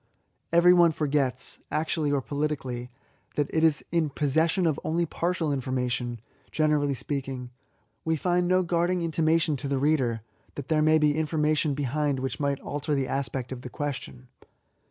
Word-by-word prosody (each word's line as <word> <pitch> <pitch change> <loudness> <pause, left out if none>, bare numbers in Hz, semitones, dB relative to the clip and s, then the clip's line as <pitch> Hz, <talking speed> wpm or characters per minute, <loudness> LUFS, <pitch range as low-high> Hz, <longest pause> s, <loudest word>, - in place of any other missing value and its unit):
Everyone 170 0 +6
forgets, 140 -4 -1
actually 155 -1 0
or 140 -2 0
politicly, 140 -4 -3 0.5
that 145 -1 -1
it 160 - +2
is 160 -2 +3
in 165 -3 +1
possession 160 +6 +1
of 155 -4 +1
only 170 +2 0
partial 165 -2 -1
information, 125 -2 -2 0.3
generally 150 -3 +2
speaking; 130 -2 -4 0.5
we 160 0 +1
find 175 +2 +1
no 185 +1 +3
guard 175 0 +1
ing 180 -1 0
intimation 160 -1 +2
to 135 - -4
the 140 0 0
reader, 130 -6 +1 0.3
that 140 -2 -7
there 155 -1 +3
may 155 +1 +5
be 150 -1 +4
68 - - +1
£S»AYS. 155 - -1
information 155 -1 +1
behind 145 0 0
which 130 0 -3
might 140 -1 0
alter 145 +1 -2
the 135 -2 0
aspect 130 -2 -3
of 130 -2 -5
the 125 - -7
question. 135 -2 -5
150 Hz, 165 wpm, -27 LUFS, 135-160 Hz, 0.5 s, Everyone